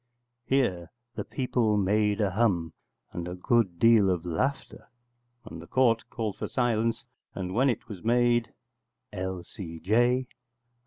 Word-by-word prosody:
[Here 95 Hz, -11 st, 0 dB, 0.2 s
the -, -, -4 dB
people 120 Hz, -5 st, 0 dB
made 105 Hz, +2 st, +1 dB
a 100 Hz, -2 st, +1 dB
hum, 90 Hz, -6 st, +1 dB, 0.4 s
and 85 Hz, 0 st, -5 dB
a 90 Hz, -, -5 dB
good 95 Hz, -1 st, +1 dB
deal 115 Hz, -1 st, +5 dB
of 90 Hz, -2 st, -1 dB
laughter, 130 Hz, -, -3 dB, 0.6 s
and 80 Hz, 0 st, -9 dB
the 85 Hz, -, -12 dB
Court 115 Hz, -1 st, +2 dB
called 110 Hz, -4 st, -4 dB
for -, -, -4 dB
silence, 115 Hz, -2 st, 0 dB, 0.3 s
and 90 Hz, -1 st, -4 dB
when 130 Hz, +6 st, +3 dB
it 120 Hz, -, -3 dB
was 100 Hz, -5 st, -9 dB
made] 120 Hz, 0 st, +2 dB, 0.6 s
_L.C.J. 95 Hz, +6 st, -1 dB
105 Hz, 130 wpm, -27 LUFS, 90-120 Hz, 0.6 s, deal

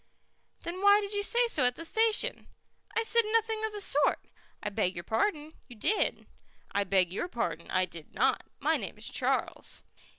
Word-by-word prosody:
"Then 350 Hz, +3 st, -5 dB
why 405 Hz, +1 st, +7 dB
did 410 Hz, 0 st, -3 dB
you 410 Hz, -, 0 dB
say 475 Hz, +4 st, +2 dB
so 305 Hz, -, +1 dB
at 250 Hz, 0 st, +3 dB
the 330 Hz, -, -5 dB
station?" 450 Hz, +5 st, +1 dB, 0.5 s
"I 455 Hz, -, +3 dB
said 465 Hz, +1 st, +4 dB
nothing 445 Hz, -1 st, +1 dB
of 440 Hz, -, -1 dB
the 415 Hz, -1 st, -6 dB
sort." 295 Hz, -6 st, +3 dB, 0.4 s
"I 210 Hz, -, -1 dB
beg 195 Hz, -3 st, 0 dB
your 175 Hz, -, -5 dB
pardon, 300 Hz, -, -1 dB
you 245 Hz, -, -12 dB
did." 405 Hz, -, 0 dB, 0.5 s
"I 200 Hz, 0 st, +1 dB
beg 185 Hz, -2 st, +2 dB
your 350 Hz, -, -2 dB
pardon, 230 Hz, -, -3 dB
I 185 Hz, 0 st, +2 dB
did 165 Hz, -3 st, -12 dB
not. -, -, +2 dB, 0.2 s
My -, -, +2 dB
name -, -, -7 dB
is -, -, -2 dB
Charles." -, -, -1 dB
330 Hz, 190 wpm, -30 LUFS, -, 0.5 s, why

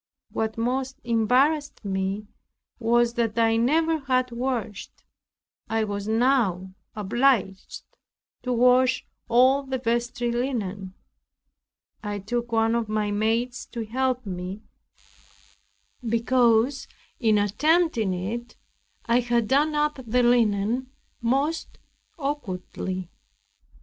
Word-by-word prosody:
What 220 Hz, 0 st, -2 dB
most 260 Hz, +3 st, -2 dB
embarrassed 250 Hz, +5 st, +1 dB
me 195 Hz, +1 st, -2 dB, 0.5 s
was 235 Hz, 0 st, +2 dB
that 230 Hz, -2 st, -1 dB
I 225 Hz, -1 st, +3 dB
never 320 Hz, +7 st, +2 dB
had 255 Hz, -2 st, 0 dB
washed. 235 Hz, -4 st, -4 dB, 0.7 s
I 225 Hz, 0 st, +1 dB
was 205 Hz, -1 st, -4 dB
now 220 Hz, -6 st, +1 dB, 0.2 s
obliged 210 Hz, -2 st, 0 dB, 0.6 s
to 250 Hz, -, -3 dB
wash 250 Hz, +1 st, +3 dB, 0.2 s
all 255 Hz, +4 st, +5 dB
the 265 Hz, -1 st, -3 dB
vestry 240 Hz, 0 st, -1 dB
linen. 205 Hz, -7 st, -3 dB, 1.1 s
I 205 Hz, -2 st, -4 dB
took 235 Hz, +4 st, -3 dB
one 225 Hz, 0 st, +2 dB
of 235 Hz, -2 st, -1 dB
my 215 Hz, -1 st, 0 dB
maids 225 Hz, +4 st, -1 dB
to 230 Hz, -2 st, -3 dB
help 255 Hz, +2 st, -1 dB
me, 185 Hz, +2 st, -6 dB, 1.4 s
because 235 Hz, +2 st, +2 dB, 0.3 s
in 220 Hz, -4 st, +3 dB
attempting 235 Hz, -, +2 dB
it 230 Hz, +7 st, -5 dB, 0.5 s
I 235 Hz, 0 st, +3 dB
had 240 Hz, -2 st, +1 dB
done 295 Hz, +4 st, +2 dB
up 295 Hz, -1 st, 0 dB
the 245 Hz, +2 st, +2 dB
linen 240 Hz, +1 st, +2 dB, 0.3 s
most 275 Hz, +7 st, -1 dB, 0.4 s
awkwardly. 185 Hz, -, -4 dB
235 Hz, 105 wpm, -25 LUFS, 215-255 Hz, 1.4 s, all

